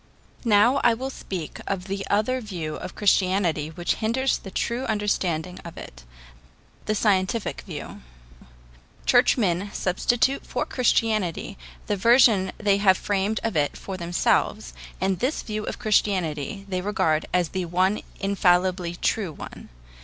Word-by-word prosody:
Now 230 +5 +4
I 235 - +5
will 260 +3 -4
speak 180 - -6
of 195 -2 -2
the 195 0 -3
other 235 +5 +1
view 175 -8 -5
of - - -7
Christianity 185 -6 +2
which 175 +2 -1
hinders 245 +4 +1
the 195 - -9
true 235 +6 -2
understanding 185 -6 -1
of 170 - -10
it - - -11 0.8
the 215 - +1
scientific 200 +1 0
view. - - -7 1.0
Churchmen 185 - +3
substitute 240 +8 +1
for - - -2
Christianity 215 -6 0 0.3
the 205 - -1
version 220 -3 +5
they 205 -2 +2
have 190 -2 +4
framed 205 +2 -1
of 225 -5 -2
it 145 -2 0
for 195 - -6
themselves, 170 - 0 0.3
and 190 -1 0
this 260 +5 -1
view 215 -1 -4
of - - -4
Christianity 195 - 0
they 185 -2 -2
regard 165 -6 0
as 180 -3 +1
the 185 -1 -3
one 185 +4 +1 0.2
infallibly 180 -2 +1
true 190 0 -1
one. 150 - -10
195 Hz, 140 wpm, -24 LUFS, 180-215 Hz, 1.0 s, I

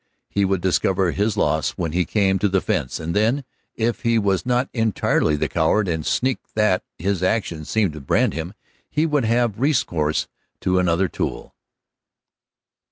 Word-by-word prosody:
He 100 -1 +2
would 95 -2 0
discover 95 0 +1
his 105 +3 0
loss 75 -2 0
when 85 -3 -2
he 90 +2 +1
came 95 -3 +1
to 100 +2 +2
the 95 0 +2
fence, 65 -7 -2
and 80 +3 -4
then, 115 +7 +2 0.3
if 115 +1 -1
he 115 -1 +2
was 100 -2 0
not 125 +1 +2
entirely 110 -9 +1
the 75 - -1
coward 95 +6 +1
and 80 -2 -1
sneak 130 - 0 0.2
that 105 -4 +2
his 95 +1 -1
actions 90 -5 -1
seemed 105 -7 +1
to 75 - -8
brand 70 - +1
him, 80 +5 -5 0.3
he 155 +2 +1
would 150 -6 +1
have 115 -2 +1
recourse 85 - +1 0.3
to 90 0 +2
another 90 +1 +2
tool. - - -4
95 Hz, 165 wpm, -22 LUFS, 85-115 Hz, 0.3 s, He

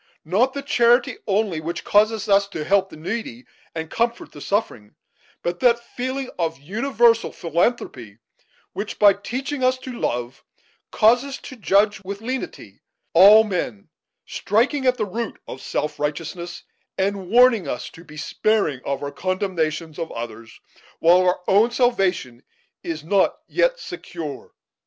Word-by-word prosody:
Not 220 +11 +2
that 280 -1 -5
charity 240 -2 +3
only 200 -5 0
which 170 +2 -4
causes 215 +1 +2
us 200 -1 +4
to 165 -6 -5
help 195 +2 +2
the - - -12
needy 170 - -5 0.3
and 160 0 -4
comfort 235 +7 -2
the 145 - -12
suffering, 125 - -2 0.5
but 175 0 -2
that 240 -2 +4
feeling 255 +2 -5
of 165 -1 -1
universal 230 - +2
philanthropy 165 - -2 0.6
which, 205 +2 -5
by 205 -1 +7
teaching 260 +7 -4
us 255 0 +3
to 255 0 -8
love, 125 - -3 0.5
causes 245 +5 +3
us - - -7
to 260 - -9
judge 205 -2 +2
with 200 +1 -6
lenity 255 +4 -6 0.3
all 205 +6 +8
men; 175 - -4 0.4
striking 260 +6 0
at 250 0 +3
the 215 - 0
root 225 +3 -5
of 130 - -8
self 150 - -3
righteousness, 165 +4 -4 0.3
and 195 -1 -1
warning 235 - +5
us 125 - -4
to 165 - -14
be 155 -2 -13
sparing 160 - 0
of 140 +1 -3
our 140 - -4
condemnation 170 -4 -2
of 165 - -4
others, 115 -1 -8 0.4
while 170 +2 +5
our 180 0 +1
own 210 +5 +4
salvation 195 - 0 0.4
is 160 -2 -5
not 190 +4 +2
yet - - +1
secure." 165 - -7
200 Hz, 145 wpm, -22 LUFS, 160-235 Hz, 0.6 s, all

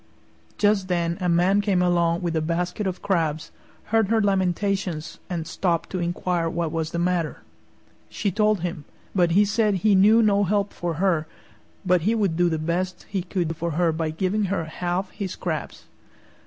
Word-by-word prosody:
Just 205 -2 +2
then 170 -2 0
a 180 - +1
Man 180 +4 +3
came 200 -3 +1
along 175 -1 +2
with 170 -2 -1
a 160 - +1
basket 175 +5 -2
of 185 -1 -4
crabs, 160 -5 -1 0.4
heard 225 -2 +4
her 225 +2 +2
lamentations, 190 -4 -1
and 170 -3 -3
stopped 170 -2 -1
to 185 - -2
inquire 175 -1 -1
what 165 -1 -2
was 160 -1 -2
the 170 - -4
matter. 175 -2 -1 0.7
She 200 - -2
told 210 -1 +2
him, 170 -4 -4 0.3
but 175 -3 +2
he 205 +3 +5
said 215 0 +1
he 210 - +6
knew 210 +4 +6
no 205 -1 +3
help 200 +1 0
for 170 -2 -3
her, 165 -3 +1 0.6
but 180 -1 +3
he 215 +7 +1
would 200 -7 +1
do 175 +1 +3
the 160 - -1
best 175 +4 -2
he 195 -2 -1
could 175 -2 -2
for 170 0 -3
her 175 -2 +3
by 160 0 -2
giving 190 +6 0
her 190 -4 -1
half 175 +4 -3
his 195 -3 -5
crabs. - - -4
180 Hz, 180 wpm, -24 LUFS, 170-200 Hz, 0.7 s, he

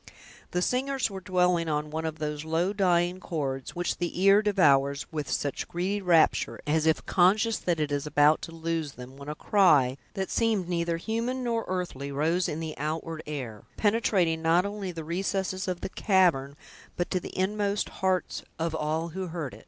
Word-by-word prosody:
The 180 0 0
singers 265 0 0
were 195 - -5
dwelling 180 -3 +1
on 150 0 -2
one 160 +1 -3
of 160 0 -5
those 150 -1 -3
low, 165 +5 0
dying 180 -2 +2
chords, 135 -7 -4
which 175 0 -1
the 175 0 -3
ear 200 +1 +7
devours 140 -9 +3
with 150 -3 -4
such 145 -2 -2
greedy 190 +4 -2
rapture, 170 -4 +3
as 155 +1 +1
if 160 - +2
conscious 210 +5 +3
that 175 -3 -1
it 150 -1 -1
is 145 +1 -1
about 150 +1 +4
to - - -7
lose 165 -3 -3
them, 125 +1 -11
when 140 +1 -9
a 150 - -4
cry, 150 -10 +4 0.2
that 190 -1 -3
seemed 220 -6 +1
neither 170 -1 -1
human 230 +7 -2
nor 230 -2 -1
earthly, 175 -7 -3
rose 165 +6 +1
in 150 - -3
the 160 -1 -5
outward 160 +2 -3
air, 125 -8 -5 0.2
penetrating 200 -7 +2
not 165 +3 +3
only 200 -2 -4
the 165 -2 -6
recesses 190 +3 -2
of 180 -1 -3
the - - -4
cavern, 170 -10 +2 0.4
but 175 - -2
to 185 - +1
the - - -9
inmost 200 +2 0
hearts 185 -1 0 0.2
of 165 0 -2
all 160 +2 -1
who 185 +2 -4
heard 160 -5 -5
it. - - -11
170 Hz, 185 wpm, -28 LUFS, 150-190 Hz, 0.4 s, ear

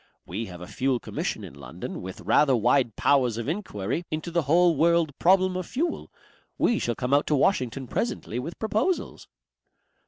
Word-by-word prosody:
We 105 +7 -4
have 90 -1 -10
a - - -6
Fuel 130 +3 0
Commission - - -4
in - - -9
London 70 -3 -7
with 95 0 -8
rather 140 -3 +4
wide 120 0 +2
powers 125 -5 +2
of 115 +1 -4
enquiry 155 - -3
into 155 +2 -4
the 170 0 +2
whole 175 +1 +5
world 165 +1 +3
problem 185 +1 +4
of 185 -2 -3
fuel. 330 +6 -3 0.5
We 235 - +2
shall 120 - -1
come 125 +1 -2
out 145 - +3
to 150 - +2
Washington 135 - +1
presently 125 - -3
with 160 +7 -6
proposals." 220 - -1
140 Hz, 175 wpm, -26 LUFS, 120-175 Hz, 0.5 s, whole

